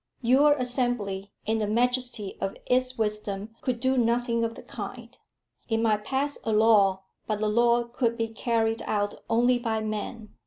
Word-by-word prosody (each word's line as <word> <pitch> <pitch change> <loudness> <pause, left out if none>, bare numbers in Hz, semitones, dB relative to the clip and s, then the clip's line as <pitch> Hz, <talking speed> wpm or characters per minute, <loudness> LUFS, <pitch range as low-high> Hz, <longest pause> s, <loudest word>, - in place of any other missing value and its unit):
"Your 275 +5 +5
Assembly 245 -7 -2
in 220 +1 0
the 210 - 0
majesty 245 -2 0
of 195 - -2
its 255 0 +1
wisdom 210 -1 -2
could 250 -2 -1
do 260 +1 +2
nothing 235 0 +1
of 230 0 -2
the - - -11
kind. - - -8 0.5
It 225 - +1
might 215 -2 +1
pass 280 +2 -1
a 225 - -1
law, 210 -3 +4 0.2
but 215 -1 -1
the 215 - 0
law 235 +2 +3
could 235 -1 -1
be 225 -1 -1
carried 225 0 0
out 205 -1 0 0.2
only 245 +2 +3
by 225 -2 -1
men. 215 +1 -5
230 Hz, 165 wpm, -27 LUFS, 215-245 Hz, 0.5 s, Your